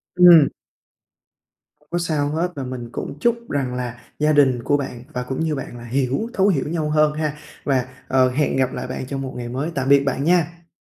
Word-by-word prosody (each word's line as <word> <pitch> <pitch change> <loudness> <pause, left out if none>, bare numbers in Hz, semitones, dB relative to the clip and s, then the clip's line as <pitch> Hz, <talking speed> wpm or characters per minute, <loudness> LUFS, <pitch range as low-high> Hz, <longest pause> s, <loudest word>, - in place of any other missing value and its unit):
Ừm. 175 -5 +8 1.3
Không - - -31
có 175 - 0
sao 155 -4 0
hết, 165 +4 -1
và 140 - -4
mình 125 -2 -6
cũng 145 - -6
chúc 235 +5 0
rằng 135 -3 -1
là 125 -1 -4 0.2
gia 150 0 +3
đình 130 -5 +3
của 145 - +2
bạn, 125 -4 -6
và 125 - -2
cũng 130 +1 -4
như 160 -2 0
bạn 130 -3 -6
là 120 - -10
hiểu 135 - -1
thấu 195 0 +3
hiểu 155 -9 +1
nhau 160 -2 -1
hơn 150 0 +3
ha. 150 -1 -2 0.3
Và, 130 -3 +1 0.2
ờ, 130 -1 +3
hẹn 140 +3 0
gặp 130 -1 +1
lại 125 0 -4
bạn 130 - -5
trong 135 0 -4
một 130 -1 -5
ngày 120 -1 -5
mới, 140 +7 -3
tạm 135 0 -1
biệt 140 0 +6
bạn 135 0 -1
nha! 170 0 +1
140 Hz, 220 wpm, -21 LUFS, 130-160 Hz, 1.3 s, Ừm